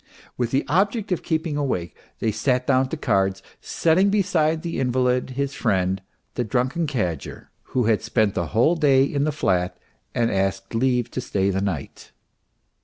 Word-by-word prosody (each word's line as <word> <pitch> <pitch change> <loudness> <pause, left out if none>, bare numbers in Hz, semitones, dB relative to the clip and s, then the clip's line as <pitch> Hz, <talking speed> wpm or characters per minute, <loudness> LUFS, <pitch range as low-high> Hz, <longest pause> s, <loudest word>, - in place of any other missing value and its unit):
With 120 -2 -1
the 135 +3 0
object 205 +5 +1
of 180 - 0
keeping 160 -2 -1
awake, 125 -12 -2 0.2
they 110 - 0
sat 125 +4 0
down 130 0 +2
to 160 - -3
cards, 95 -6 0 0.2
setting 180 +5 +2
beside 165 -6 +1
the 170 - -3
invalid 125 0 +1
his 140 0 -1
friend, 95 -6 0 0.3
the 125 - -1
drunken 130 +8 0
cadger, 90 - -4 0.3
who 125 - +4
had 110 -1 +2
spent 110 -4 +1
the 85 -3 -2
whole 115 - +3
day 140 -4 +4
in 140 +1 0
the 155 - +1
flat 90 -10 0 0.4
and 115 -1 +1
had 95 - +1
asked 95 +1 -4
leave 125 0 +1
to 130 - -3
stay 100 -5 0
the 95 0 -1
night. 90 -8 -5
125 Hz, 175 wpm, -23 LUFS, 100-150 Hz, 0.4 s, who